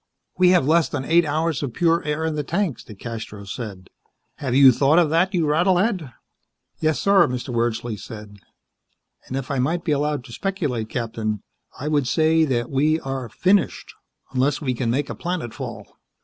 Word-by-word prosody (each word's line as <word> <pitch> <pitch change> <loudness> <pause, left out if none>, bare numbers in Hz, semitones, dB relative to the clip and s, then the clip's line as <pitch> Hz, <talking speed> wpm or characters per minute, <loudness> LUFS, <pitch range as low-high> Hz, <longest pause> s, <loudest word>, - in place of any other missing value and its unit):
"We 180 -1 +6
have 180 -7 +4
less 165 +2 +3
than 135 -2 -3
eight 170 +1 +4
hours 155 -1 0
of 135 -5 -4
pure 165 -1 +2
air 150 +1 -2
in 160 - -1
the 150 - -1
tanks," 170 - -2
DeCastros 105 -2 -8
said. 100 -6 -7 0.5
"Have 130 -4 -2
you 135 -1 +8
thought 140 +5 +3
of 165 -4 +4
that, 170 +4 +3
you 170 -3 +2
rattle 175 +5 +3
head?" 180 - 0 0.7
"Yes, 155 -1 +1
sir," 195 -4 +5
Mr. 125 +1 -4
Wordsley 120 -1 -1
said. 105 -3 -10 0.9
"And 130 - -3
if 135 +1 -4
I 135 - 0
might 165 +7 0
be 160 - -1
allowed 145 -1 0
to 115 - -13
speculate, 150 - -2
Captain, 110 -3 -3 0.4
I 145 - -4
would 145 -4 +1
say 160 +2 +3
that 120 -4 -1
we 150 +4 +2
are 135 -3 -4
finished 190 - +1 0.4
unless 135 +2 +1
we 130 -4 -1
can 120 -1 -2
make 135 +5 -1
a - - -5
planetfall. 175 -10 -5
145 Hz, 180 wpm, -22 LUFS, 120-165 Hz, 0.9 s, you